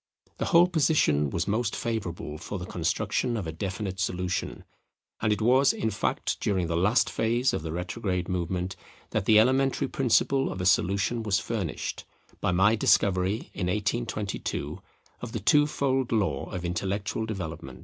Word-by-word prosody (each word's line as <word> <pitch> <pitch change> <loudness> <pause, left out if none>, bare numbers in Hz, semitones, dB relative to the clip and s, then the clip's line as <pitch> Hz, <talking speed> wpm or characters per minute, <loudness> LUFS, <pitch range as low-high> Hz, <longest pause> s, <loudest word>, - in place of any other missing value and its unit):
The - - 0
whole 170 -1 +6
position 150 - +2
was 85 +6 -2
most 110 +1 0
favourable 90 -9 -4
for 100 +4 -5
the 90 - -6
construction 90 +7 -1
of 100 - -3
a 80 - -3
definite 95 +3 -4
solution; 90 -2 -2 0.6
and 110 - +2
it 105 0 0
was, 130 +4 +5
in 110 - -1
fact, 100 - -1
during 95 -4 0
the 85 0 -2
last 105 +8 +3
phase 120 +4 +1
of - - -1
the 80 0 -5
retrograde 90 +1 -2
movement 90 0 -2 0.4
that 105 -3 -1
the 110 0 +6
elementary 130 +4 +2
principle 135 +1 +2
of - - -6
a 90 - -2
solution 100 +5 +2
was 105 -3 +1
furnished, 100 -7 -3 0.4
by - - 0
my 95 +5 +4
discovery, 100 -1 +2
in 90 - -2
1822, 105 +1 -2 0.4
of - - -6
the - - -2
two 145 0 +4
fold 135 -3 0
law 95 - 0
of 90 -1 -5
intellectual 100 +5 -2
development. 80 - -6
100 Hz, 160 wpm, -27 LUFS, 90-115 Hz, 0.6 s, whole